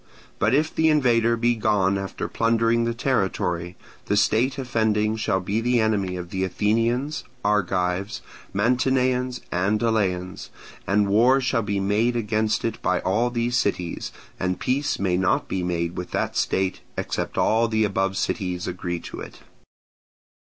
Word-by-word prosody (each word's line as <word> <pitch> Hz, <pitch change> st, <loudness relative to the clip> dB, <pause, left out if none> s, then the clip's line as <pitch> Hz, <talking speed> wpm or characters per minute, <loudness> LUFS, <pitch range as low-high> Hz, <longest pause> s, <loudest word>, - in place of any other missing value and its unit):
But 110 Hz, +5 st, +3 dB
if 155 Hz, +2 st, +1 dB
the 160 Hz, 0 st, +3 dB
invader 115 Hz, -6 st, +3 dB
be 120 Hz, +1 st, +2 dB
gone 105 Hz, -4 st, +1 dB
after 95 Hz, 0 st, -4 dB
plundering 115 Hz, 0 st, +2 dB
the 115 Hz, -, 0 dB
territory, 95 Hz, -8 st, -1 dB, 0.3 s
the 100 Hz, -, +1 dB
state 120 Hz, +6 st, +2 dB
offending 110 Hz, -4 st, +1 dB
shall 110 Hz, -4 st, 0 dB
be 100 Hz, +4 st, -1 dB
the 120 Hz, +1 st, +2 dB
enemy 100 Hz, -4 st, 0 dB
of 90 Hz, -1 st, -7 dB
the 95 Hz, 0 st, -1 dB
Athenians, 115 Hz, -, 0 dB, 0.2 s
Argives, 95 Hz, 0 st, 0 dB, 0.3 s
Mantineans, 125 Hz, +3 st, +1 dB
and 100 Hz, +4 st, +1 dB
Eleans, 95 Hz, -6 st, -1 dB, 0.4 s
and 100 Hz, +1 st, +2 dB
war 120 Hz, +7 st, +4 dB
shall 125 Hz, -2 st, 0 dB
be 100 Hz, -2 st, -1 dB
made 105 Hz, +5 st, +1 dB
against 110 Hz, -1 st, 0 dB
it 115 Hz, -1 st, -3 dB
by 90 Hz, -, +1 dB
all 110 Hz, +6 st, +1 dB
these 120 Hz, 0 st, 0 dB
cities, 90 Hz, -4 st, -2 dB, 0.3 s
and 90 Hz, 0 st, -1 dB
peace 140 Hz, +3 st, 0 dB
may 95 Hz, -2 st, 0 dB
not 90 Hz, 0 st, +1 dB
be 95 Hz, -, -2 dB
made 85 Hz, -1 st, -2 dB
with 90 Hz, -, -5 dB
that -, -, -2 dB
state 95 Hz, -1 st, 0 dB, 0.2 s
except -, -, -3 dB
all 115 Hz, +1 st, +3 dB
the 110 Hz, -1 st, +1 dB
above 95 Hz, -2 st, 0 dB
cities 90 Hz, -3 st, -2 dB
agree 90 Hz, -1 st, -3 dB
to -, -, -8 dB
it. -, -, -10 dB
110 Hz, 150 wpm, -24 LUFS, 95-120 Hz, 0.4 s, war